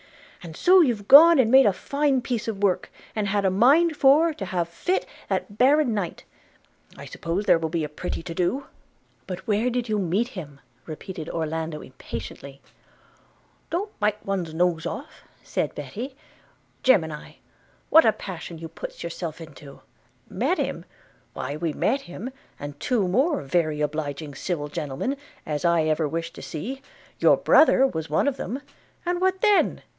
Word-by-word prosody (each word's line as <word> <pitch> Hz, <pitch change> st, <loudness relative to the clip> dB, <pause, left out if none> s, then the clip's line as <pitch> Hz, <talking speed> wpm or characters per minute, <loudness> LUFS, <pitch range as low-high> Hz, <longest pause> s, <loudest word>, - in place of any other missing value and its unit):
And 165 Hz, -2 st, -9 dB
so 370 Hz, +1 st, +6 dB
you've 230 Hz, -10 st, 0 dB
gone 330 Hz, +4 st, +9 dB
and 240 Hz, -4 st, +3 dB
made 265 Hz, -2 st, +7 dB
a 200 Hz, -, +3 dB
fine 280 Hz, +3 st, 0 dB
piece 235 Hz, -2 st, -3 dB
of 205 Hz, -3 st, -4 dB
work, 190 Hz, -3 st, +1 dB, 0.2 s
and 210 Hz, -2 st, -1 dB
had 200 Hz, 0 st, 0 dB
a 190 Hz, -, +3 dB
mind 290 Hz, -, +4 dB
for 300 Hz, +4 st, +5 dB
to 200 Hz, -, -6 dB
have 175 Hz, -2 st, -1 dB
fit 355 Hz, -, -1 dB, 0.2 s
that 205 Hz, -2 st, -3 dB
baron 275 Hz, -1 st, +4 dB
knight 200 Hz, -5 st, -3 dB, 0.4 s
– -, -, -28 dB
I -, -, -9 dB
suppose 175 Hz, +5 st, -3 dB
there 165 Hz, -, +5 dB
will 160 Hz, -1 st, -2 dB
be 165 Hz, 0 st, -1 dB
a -, -, -2 dB
pretty 165 Hz, +2 st, -5 dB
to 170 Hz, -, -6 dB
do!' 185 Hz, +11 st, -1 dB, 0.6 s
'But 185 Hz, 0 st, -6 dB
where 220 Hz, +3 st, +1 dB
did 245 Hz, -1 st, -2 dB
you 215 Hz, -1 st, 0 dB
meet 195 Hz, +6 st, 0 dB
him?' 145 Hz, -, -9 dB, 0.3 s
repeated 160 Hz, +1 st, -7 dB
Orlando 160 Hz, -1 st, -3 dB
impatiently. 130 Hz, +2 st, -8 dB, 1.1 s
'Don't 400 Hz, +5 st, -3 dB
bite 210 Hz, 0 st, 0 dB
one's 180 Hz, -5 st, -3 dB
nose 170 Hz, -1 st, +1 dB
off,' -, -, -7 dB, 0.2 s
said -, -, -2 dB
Betty: 220 Hz, -, -6 dB, 0.7 s
'Gemini! 160 Hz, -12 st, +1 dB, 0.6 s
what 320 Hz, -, +8 dB
a 220 Hz, -, +5 dB
passion 175 Hz, -4 st, -8 dB
you 165 Hz, +1 st, -7 dB
puts 160 Hz, -, -8 dB
yourself 170 Hz, -1 st, -5 dB
into 150 Hz, -3 st, -12 dB, 0.3 s
– -, -, -39 dB
Met -, -, 0 dB
him! -, -, -3 dB, 0.2 s
– -, -, -35 dB
why 140 Hz, +3 st, -4 dB
we 160 Hz, +1 st, -2 dB
met 275 Hz, -, 0 dB
him, 190 Hz, +7 st, -7 dB, 0.3 s
and 145 Hz, 0 st, -7 dB
two 225 Hz, -7 st, +1 dB
more 265 Hz, -, +1 dB
very 155 Hz, +1 st, 0 dB
obliging 150 Hz, -1 st, -3 dB
civil 145 Hz, 0 st, -3 dB
gentlemen 150 Hz, -, -3 dB, 0.3 s
as 150 Hz, -2 st, -3 dB
I 170 Hz, -2 st, +3 dB
ever 155 Hz, 0 st, +1 dB
wish 165 Hz, +2 st, -4 dB
to -, -, -10 dB
see; 250 Hz, -, -6 dB, 0.4 s
your -, -, +5 dB
brother 285 Hz, -4 st, +5 dB
was 160 Hz, -, -3 dB
one 155 Hz, -, +1 dB
of 275 Hz, -2 st, 0 dB
them, 270 Hz, +4 st, -5 dB, 0.4 s
and 350 Hz, 0 st, -1 dB
what 375 Hz, 0 st, +1 dB
then? 420 Hz, -2 st, +3 dB
185 Hz, 170 wpm, -25 LUFS, 160-255 Hz, 1.1 s, gone